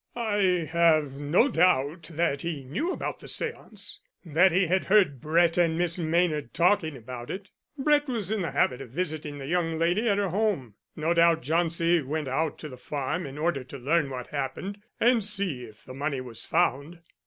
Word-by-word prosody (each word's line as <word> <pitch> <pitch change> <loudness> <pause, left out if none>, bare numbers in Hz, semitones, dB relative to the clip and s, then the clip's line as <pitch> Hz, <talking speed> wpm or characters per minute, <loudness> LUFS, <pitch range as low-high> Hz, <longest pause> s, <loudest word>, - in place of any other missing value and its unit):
"I 200 -7 +1
have 160 -4 +3
no 150 - +3
doubt 165 - +2
that 155 -3 0
he 160 -5 -4
knew 280 - -2
about - - -4
the - - -12
séance 465 -2 -4 0.3
that 170 +4 +4
he 185 +3 +3
had 185 +3 +1
heard 190 - +3
Brett 165 +2 +3
and 165 -2 +2
Miss 175 0 0
Maynard 160 -5 0
talking 170 -4 +2
about 120 0 -8
it. 190 0 -6 0.3
Brett 295 +1 +3
was 225 -6 -2
in 220 -2 0
the 170 - -1
habit 135 -2 +1
of 135 - -9
visiting 155 0 -3
the 135 - -7
young 165 +1 0
lady 175 +8 +1
at 200 - +2
her 200 -2 0
home. 185 - -1 0.2
No 160 +2 0
doubt 170 -1 +4
Jauncey 165 +2 +2
went 150 +2 -3
out 150 +4 -1
to 155 - -7
the 130 -3 -10
farm 145 +5 -3
in 135 +1 -9
order 150 -4 0
to 135 +2 -10
learn 145 +3 +1
what 125 -2 -5
happened, 185 +8 -4 0.2
and 235 -2 +4
see 195 -11 -2
if 105 -2 -16
the 130 - -9
money 140 0 -2
was 125 -3 -6
found." 145 +7 0
165 Hz, 190 wpm, -27 LUFS, 140-185 Hz, 0.3 s, that